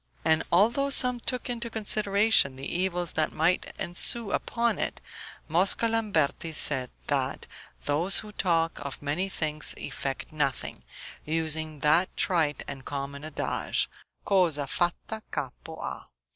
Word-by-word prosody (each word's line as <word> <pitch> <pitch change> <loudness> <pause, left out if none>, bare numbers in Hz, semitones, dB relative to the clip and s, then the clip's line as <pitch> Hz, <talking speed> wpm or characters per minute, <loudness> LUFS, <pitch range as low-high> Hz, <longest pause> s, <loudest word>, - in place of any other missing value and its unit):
And 160 0 +4
although 235 +10 +4
some 250 -3 +4
took 250 +1 0
into 235 -1 -3
consideration 210 -7 +3
the 135 +1 -7
evils 180 0 -1
that 155 -1 +1
might 170 +3 +1
ensue 200 +5 +2
upon 235 0 0
it, - - -2 0.5
Mosca 185 +8 +3
Lamberti 195 -8 0
said, 130 -4 +3 0.2
that - - -1 0.4
those 165 +7 +3
who 215 - -10
talk 165 -5 +1
of 140 - -6
many 160 +7 -1
things 155 -4 -1
effect 135 0 -4
nothing, 140 -4 -2 0.4
using 155 -1 -2
that 155 +5 +3
trite 160 -6 +1
and 135 -1 -7
common 140 +1 -5
adage, 155 -1 -2 0.4
Cosa 170 -7 +3
fatta 175 +9 -2
capo - - -5
ha. - - -6
165 Hz, 130 wpm, -28 LUFS, 150-205 Hz, 0.5 s, And